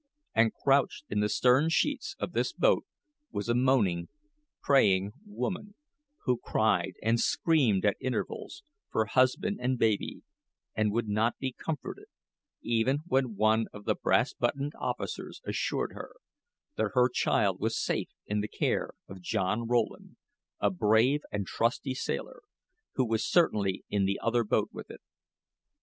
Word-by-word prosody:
And, 115 0 +4
crouched 140 +1 +1
in 105 - +1
the 105 0 +1
stern 130 +8 +4
sheets 280 - 0
of - - -4
this - - 0
boat - - +2 0.4
was 100 - -3
a 120 - +2
moaning, 120 -9 +2 0.5
praying 100 -8 +3 0.2
woman, 205 0 -4 0.5
who 125 -2 +1
cried - - +1
and 115 +2 +2
screamed 130 - +2
at 105 - +2
intervals, 130 +3 -4 0.3
for 110 - +1
husband 130 - +2
and 125 +1 0
baby, 110 -3 0 0.5
and 110 -1 +1
would 115 +1 -1
not 110 +3 +1
be 130 -1 -3
comforted, 150 +3 -6 0.6
even 120 +5 +1
when 130 -8 0
one 110 +2 +3
of 105 0 -11
the - - +2
brass - - +1
buttoned 140 +2 -1
officers - - -4
assured - - -1
her - - -9 0.6
that - - 0
her 125 -1 +5
child 125 - +1
was - - -1
safe - - -1 0.2
in 105 0 -1
the 105 - -3
care - - -1
of 95 -1 -10
John 105 +4 -1
Rowland, 120 -2 -1 0.4
a 100 - +2
brave 110 +9 +3
and 100 -1 -2
trusty 120 +6 -1
sailor, 130 - -4 0.5
who 130 - +2
was 110 -1 0
certainly 100 - +2
in 100 -2 +1
the 100 +1 -1
other 120 0 +1
boat 105 - +1
with - - -9
it. - - -11
115 Hz, 150 wpm, -29 LUFS, 105-135 Hz, 0.6 s, her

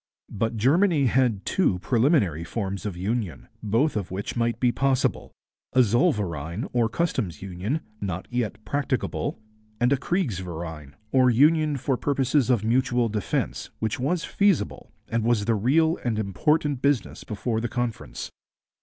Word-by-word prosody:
But 115 +2 -1
Germany 150 - +3
had 130 +2 +3
had 110 -6 0
two 180 - +2
preliminary 115 - +2
forms 100 +2 -3
of 95 -4 -5
union, 100 0 -3
both 115 +8 +1
of 100 -4 -2
which 95 +2 -4
might 115 -1 0
be 125 -1 +3
possible, 135 0 0 0.4
a 130 0 +6
zollverein 105 - 0
or 120 -2 +2
customs 115 - -2
union, 95 - -3 0.2
not 95 -2 -4
yet 110 -3 -2
practicable, 140 +4 -2 0.4
and 125 +3 +3
a - - +2
kriegsverein, 85 - -3 0.2
or 130 -1 +5
union 150 +4 +4
for 130 0 0
purposes 135 -1 +1
of 120 -5 +3
mutual 120 0 +2
defence, 105 -2 -2
which 110 -3 -2
was 160 +7 0
feasible, 195 - 0 0.2
and 115 -1 -1
was 115 -3 +2
the 115 - +2
real 155 - +2
and 115 -3 0
important 135 - +1
business 140 -6 0
before 110 +1 -2
the 120 - -2
Conference. 120 -1 -4
120 Hz, 145 wpm, -25 LUFS, 100-135 Hz, 0.4 s, a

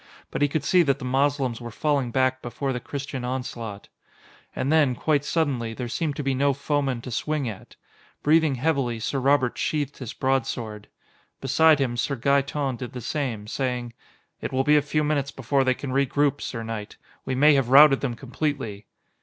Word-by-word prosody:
But - - -3
he 145 - +5
could 150 +2 -2
see 180 -1 +4
that 140 -5 +2
the - - -7
Moslems 135 -2 0
were 120 - -6
falling 140 +1 0
back 130 +1 +1
before 135 +3 -3
the 125 - -3
Christian 140 0 -5
onslaught. 125 -5 -5 0.7
And 135 - -1
then, 150 -5 +4
quite 145 +3 +1
suddenly, 135 -8 -1
there 125 0 -4
seemed 145 +5 -2
to 145 - -4
be 135 0 0
no 140 +2 +2
foeman 140 -3 -1
to 125 - -8
swing 150 +3 -1
at. 105 -4 -8 0.5
Breathing 155 -2 +4
heavily, 130 -4 0
Sir 135 +5 -2
Robert 135 -2 +2
sheathed 145 -2 -2
his 130 -1 -6
broadsword. 120 -7 -2 0.5
Beside 155 +4 +4
him, 125 -4 -1
Sir 140 +4 0
Gaeton 140 +1 0
did 125 -1 -7
the 125 - -5
same, 120 -5 -3
saying: 125 0 -3 0.5
"It - - -4
will 130 0 +1
be 150 +2 +4
a 150 - +5
few 150 +1 0
minutes 145 -2 0
before 135 +1 0
they 130 -1 +2
can 135 0 -6
regroup, 140 +1 +1
sir 115 -2 -4
knight. 110 -2 -6 0.3
We 130 - -2
may 150 +3 +6
have 135 -4 +2
routed 135 +1 +7
them 125 -4 -2
completely." 130 -5 -4
135 Hz, 185 wpm, -25 LUFS, 125-145 Hz, 0.7 s, routed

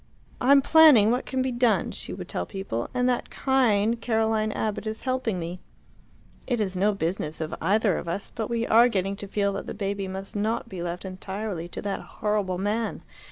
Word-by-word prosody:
"I 250 - +1
am 280 -1 +7
planning 290 -10 +7
what 250 +2 -1
can 260 -1 0
be 260 - -1
done," 240 -7 +2
she - - -7
would - - -6
tell 90 - -3
people, 190 - -4
"and 250 0 +1
that 245 -1 0
kind 230 -4 +2
Caroline 220 -2 +1
Abbott 215 +1 -2
is 220 +1 -4
helping 255 -6 -1
me. 175 +1 -5 0.9
It 245 -3 0
is 195 -3 -1
no 200 +3 +3
business 165 -3 -2
of 160 -1 -4
either 200 +2 +2
of - - -8
us, 175 +4 -4
but 225 -2 -3
we 230 -1 0
are 235 +2 +6
getting 195 -2 -1
to 200 - -7
feel 200 0 0
that 195 - -5
the - - -5
baby 200 -1 -2
must 190 +2 -6
not 220 +3 -1
be 190 -5 -7
left 175 +2 -4
entirely 190 -1 -5
to - - -7
that 200 -1 -2
horrible 205 -4 -2
man. 210 +4 -2
210 Hz, 205 wpm, -26 LUFS, 190-230 Hz, 0.9 s, am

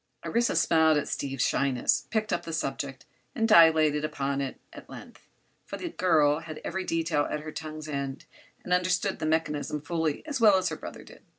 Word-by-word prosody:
Orissa, 235 -2 +1
smiling 160 -1 +4
at 145 - -2
Steve's 135 -2 -2
shyness, 135 -3 +1
picked 215 -1 -1
up - - 0
the 165 - -6
subject 135 -3 -4 0.3
and 225 - +1
dilated 160 -6 +5
upon 140 -2 -2
it 135 -2 -5
at - - -12
length, - - -13 0.3
for - - -7
the 345 - -5
girl 155 - +2
had 160 -1 -8
every 190 - -3
detail 165 -4 0
at 150 - -3
her 155 0 -7
tongue's 155 0 -7
end 140 -2 -4 0.4
and 180 - -1
understood 180 +2 +1
the 155 - -2
mechanism 150 -2 -1
fully 160 - -2
as 285 -5 -4
well 210 -4 +7
as 185 -2 0
her 160 - -4
brother - - -9
did. - - -16
155 Hz, 190 wpm, -27 LUFS, 145-180 Hz, 0.4 s, well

